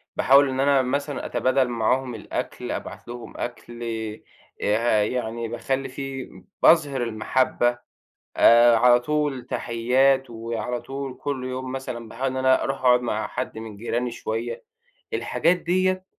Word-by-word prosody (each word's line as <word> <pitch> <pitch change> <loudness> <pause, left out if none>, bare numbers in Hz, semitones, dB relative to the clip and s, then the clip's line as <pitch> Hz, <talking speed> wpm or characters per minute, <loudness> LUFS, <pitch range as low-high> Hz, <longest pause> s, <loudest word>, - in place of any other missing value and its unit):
باحاول 140 +1 +5
إن 130 0 -3
أنا 140 0 +4
مثلًا 140 +2 -2
أتبادل 130 0 +1
معاهم 120 +2 0
الأكل، 110 - -5
أبعت - - -6
لهم 120 0 -9
أكل، 120 0 -6 0.8
آآ 110 0 +2
يعني 115 0 -3
باخلّي 135 +3 -2
في 135 0 -6 0.3
باظهِر 145 -6 +5
المَحبّة، 120 +2 0 0.6
آآ 120 0 +7
على 120 +1 +5
طول 145 -2 -1
تحيّات 130 +3 +1
وعلى 115 +1 -4
طول 135 -1 -6
كل 140 -3 -3
يوم 130 0 -4
مثلًا 130 -3 -6
باحاول 125 +4 -3
إن 130 - -5
أنا 130 0 +3
أروح 135 0 -2
أقعُد 125 -1 +5
مع 120 - -2
حد - - -5
من 110 -2 -8
جيراني 120 +3 -2
شوية. 115 0 -4 0.5
الحاجات 175 +1 +1
ديّة 185 +2 0
125 Hz, 135 wpm, -24 LUFS, 120-135 Hz, 0.8 s, آآ